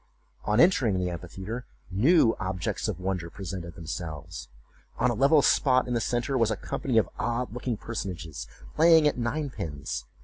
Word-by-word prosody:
On - - +2
entering 130 - +4
the 90 -1 -1
amphitheatre, 95 +7 -6 0.3
new 120 - +4
objects 95 -3 -2
of - - -3
wonder 90 -2 -2
presented 90 -2 -7
themselves. 85 0 -6 0.5
On 125 - +2
a - - 0
level 140 +5 +4
spot 130 -2 +3
in 125 - -2
the 120 - +1
centre 120 +4 0
was 115 -2 +3
a 110 - 0
company 125 +3 -2
of 110 - +4
odd 120 0 -1
looking 125 -2 -3
personages 90 - -5 0.3
playing 160 -1 +6
at 145 - 0
nine 140 +4 -2
pins. 70 - -5
110 Hz, 165 wpm, -27 LUFS, 90-125 Hz, 0.5 s, playing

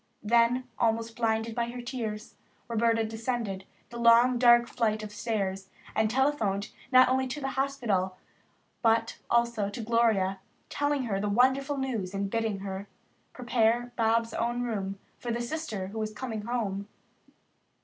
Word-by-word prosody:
Then, 235 +3 +3
almost 230 0 0
blinded 225 -1 0
by 235 0 -1
her 245 +1 -6
tears, 225 -4 -5 0.3
Roberta 230 -1 +2
descended 225 -3 -3 0.3
the 235 - -7
long, 235 +1 +5
dark 240 -1 +6
flight 215 -3 0
of 210 - -7
stairs 195 -3 -3 0.2
and 220 0 +2
telephoned 220 -6 0 0.2
not 255 0 +7
only 260 +1 +1
to 265 +4 -4
the 270 -1 -2
hospital, 235 -10 -1 0.6
but 225 -1 +2
also 235 -4 +2
to 205 +4 -6
Gloria, 215 -4 +2 0.3
telling 290 -1 0
her 205 -5 -1
the 205 +1 -1
wonderful 265 +6 +2
news 225 -8 -3
and 195 0 -2
bidding 225 -4 -1
her 195 0 -5 0.4
prepare 240 0 +1
Bobs' 230 0 +1
own 240 +1 -1
room 200 -5 -3 0.2
for 240 - -5
the 235 - -1
sister 240 -7 -4
who 220 +2 -6
was 215 0 -2
coming 220 -1 -4
home. 205 -5 -2
230 Hz, 150 wpm, -29 LUFS, 210-245 Hz, 0.6 s, not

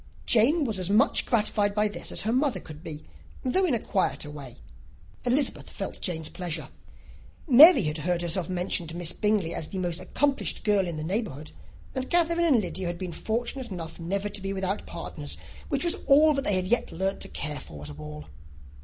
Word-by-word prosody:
Jane 270 +9 +4
was 220 -7 -2
as 185 0 -1
much 220 +8 +4
gratified 210 -3 +1
by 210 0 +3
this 205 - -4
as - - +1
her 225 - 0
mother 260 -6 +1
could 155 -1 -11
be, 155 -2 -8 0.4
though 370 +9 +2
in 300 -9 +2
a - - -1
quieter 150 -8 -1
way. 140 -5 -10 0.7
Elizabeth 265 +4 +1
felt - - -6
Jane's 160 -4 -2
pleasure. 170 -4 -4 0.8
Mary 300 - +9
had 150 0 -2
heard 175 +2 0
herself 170 +1 0
mentioned 180 -2 +1
to 165 - -6
Miss 175 -1 -1
Bingley 210 -5 0
as 155 - -3
the 190 - -6
most 175 -2 -2
accomplished 275 +9 0
girl 205 -3 +2
in 170 -2 -4
the 155 - -4
neighbourhood; 160 - -3 0.4
and 260 0 -4
Catherine 340 -1 +3
and 305 -9 +4
Lydia 180 0 -3
had 175 0 -3
been 180 -1 -5
fortunate 240 +5 -3
enough 165 -4 -6
to - - -12
be 165 - -6
never 200 +1 -1 0.2
without 190 +2 -2
partners, - - -6 0.3
which 280 -2 0
was 345 - +2
all 300 +2 +6
that 275 -1 -2
they 205 - +2
had 185 0 0
yet 240 +6 0
learnt 190 +3 -2
to - - -3
care 150 0 -4
for 75 -2 -10
at 75 - -6
a - - -8
ball. 75 0 -9
190 Hz, 205 wpm, -27 LUFS, 165-245 Hz, 0.8 s, Mary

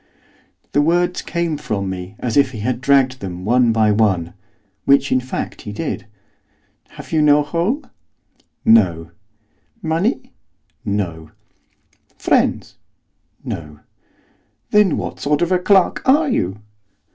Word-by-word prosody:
The 145 - +3
words 175 +3 +1
came 170 -3 -2
from 100 -8 -3
me 95 +1 -6
as 120 -3 -3
if 140 -2 +3
he 110 - -6
had 125 +2 -2
dragged 130 -1 +3
them 90 -1 -6
one 120 +1 +3
by 110 -1 +3
one, 95 -6 +1 0.5
which, 140 0 +3
in 130 - +3
fact, 130 0 -5
he 105 - -7
did. 120 +1 -4 0.8
'Have - - -12
you 160 -2 +2
no 150 0 +5
home?' 175 - -2 0.8
'No.' 85 -7 +3 0.7
'Money?' 170 - -1 0.5
'No.' 90 -7 -3 0.9
'Friends?' - - 0 0.7
'No.' 75 0 -7 0.9
'Then 210 -5 +4
what - - -5
sort 150 +3 +1
of 175 - -1
a 180 - +3
clerk 190 0 +3
are 300 +4 +4
you? 95 - -1
130 Hz, 125 wpm, -19 LUFS, 100-165 Hz, 0.9 s, no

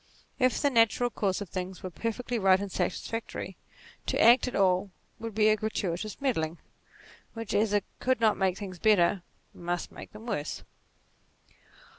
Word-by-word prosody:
If 255 -1 +3
the 285 - +2
natural 235 +1 +3
course 195 -3 -1
of 200 - -6
things 185 +1 -5
were 185 - -5
perfectly 230 +4 -3
right 190 -1 +5
and 200 -1 -5
satisfactory, 190 +6 -3 0.5
to - - 0
act 240 +3 +6
at 250 - -4
all 190 0 +3 0.3
would 225 -2 -6
be 215 -1 +4
a 215 - +5
gratuitous 210 -2 -3
meddling, 170 - -1 0.8
which 225 -2 -5
as 210 0 +2
it 205 -1 +1
could 255 -1 +1
not 220 -2 +4
make 190 -1 +1
things 185 -4 -7
better, 195 -2 +4 0.3
must 175 0 -3
make - - -10
them 215 +2 -11
worse. 180 -11 -3
205 Hz, 160 wpm, -29 LUFS, 185-230 Hz, 0.8 s, act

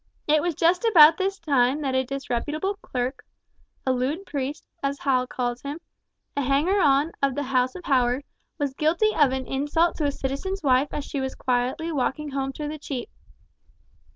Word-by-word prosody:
It 305 0 +3
was 345 -1 -1
just 345 +6 +2
about 335 -8 +7
this 390 +1 0
time 280 -4 +2
that 270 -2 -1
a 260 0 +2
disreputable 275 +8 -3
clerk—a 255 -1 -5
lewd 275 +9 -2
priest, 280 -1 -4 0.2
as 275 0 -1
Hall 255 -3 +1
calls 245 -1 -3
him—a 285 -1 -8
hanger 285 +9 +2
on 290 0 +3
of 275 -2 +1
the 290 - -1
house 255 -1 +1
of 360 - -9
Howard, 255 0 +2 0.3
was 285 -4 -1
guilty 340 +10 +2
of 290 -4 +4
an 265 0 -2
insult 295 +6 0
to 305 - 0
a 285 - +2
citizen's 285 +9 -4
wife 265 +1 +3
as 290 - -4
she 280 - -3
was 265 0 -3
quietly 255 +6 -1
walking 295 +1 -1
home 270 0 -2
through 295 +2 -5
the 305 0 -6
Cheap. 265 -4 -5
280 Hz, 175 wpm, -25 LUFS, 260-310 Hz, 0.3 s, about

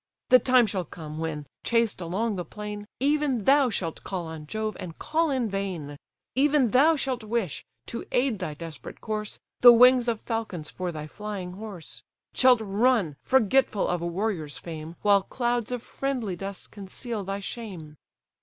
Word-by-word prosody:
The 255 - +8
time 250 0 +5
shall 195 -3 -2
come, 155 -1 -8
when, 155 -2 -3 0.2
chased 230 -5 +1
along 200 +6 -1
the 180 - -3
plain, 210 +3 -7
Even 280 -4 +1
thou 275 +2 +5
shalt 170 -7 -4
call 185 -3 -4
on 160 -2 -8
Jove, 215 +2 -3
and 165 -3 -7
call 320 +1 0
in 260 -4 0
vain; 190 -8 -4 0.4
Even 275 -3 +3
thou 300 +6 +5
shalt 260 -5 -2
wish, 215 - -2 0.2
to 235 - -6
aid 245 -4 +1
thy 155 -6 -4
desperate 160 -1 -9
course, 215 -1 -4 0.2
The 245 - +10
wings 250 +1 +6
of 230 -2 0
falcons 215 -10 -4
for 180 -1 -3
thy 155 -2 -6
flying 200 +1 -6
horse; 195 -3 -9 0.3
Shalt 255 -3 +5
run, 210 - +2
forgetful 260 -3 +3
of 175 -1 -1
a 170 - -2
warrior's 170 -6 -2
fame, 160 0 -7
While 200 -1 +5
clouds 240 +2 -1
of 245 -2 -3
friendly 250 -9 -3
dust 195 +2 -7
conceal 210 +2 -6
thy 195 +1 -3
shame." 190 -8 -7
210 Hz, 165 wpm, -27 LUFS, 175-245 Hz, 0.4 s, The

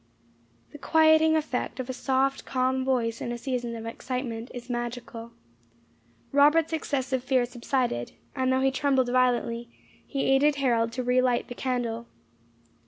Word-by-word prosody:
The 295 - -11
quieting 315 +1 +4
effect 265 -5 -2
of 255 - -3
a 260 - -3
soft, 270 +1 0
calm 260 0 0
voice 240 -4 0
in 240 - -3
a 240 - -3
season 245 -2 -3
of 225 0 -7
excitement 235 0 -4
is 245 -1 -8
magical. 240 -1 -5 1.0
Robert's 300 +3 +4
excessive 265 -4 -1
fear 255 -1 +2
subsided, 240 - -2 0.2
and 260 -1 +1
though 260 0 +2
he 270 0 +3
trembled 265 -2 +1
violently, 240 -2 +1 0.4
he 275 - -2
aided 285 +2 +3
Harold 235 -4 +1
to 255 +1 -3
re 250 +1 +3
light 250 -1 0
the - - -5
candle. 240 -3 -3
255 Hz, 150 wpm, -27 LUFS, 240-270 Hz, 1.0 s, quieting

